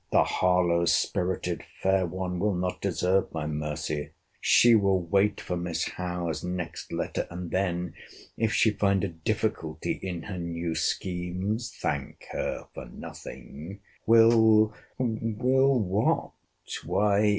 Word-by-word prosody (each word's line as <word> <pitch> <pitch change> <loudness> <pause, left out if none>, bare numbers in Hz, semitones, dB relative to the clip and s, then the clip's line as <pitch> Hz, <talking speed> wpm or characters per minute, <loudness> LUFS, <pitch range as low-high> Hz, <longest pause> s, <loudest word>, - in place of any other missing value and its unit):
—The - - +5
Harlowe 90 -2 +2
spirited 90 0 0 0.2
fair 95 -1 +3
one 90 0 -3
will 100 0 +1
not 90 +1 -2
deserve 95 +1 +1
my 80 -2 -2
mercy!—She 75 - +1
will 100 -3 +4
wait 95 +4 +2
for 90 - -3
Miss 85 -2 -2
Howe's 90 -3 -3
next 90 -1 -5
letter; - - -2
and 85 0 -6
then, 90 -2 -1 0.4
if 110 -1 +1
she 110 - +4
find 100 -1 +1
a 100 - 0
difficulty 80 -1 -2
in 90 -3 -4
her 95 -3 -5
new 85 -1 -3
schemes, 90 +7 -2
[Thank - - -3
her - - -3
for 65 - -8
nothing,]—will—will 110 - +1 0.3
what? 100 0 +1
90 Hz, 115 wpm, -28 LUFS, 85-100 Hz, 0.4 s, The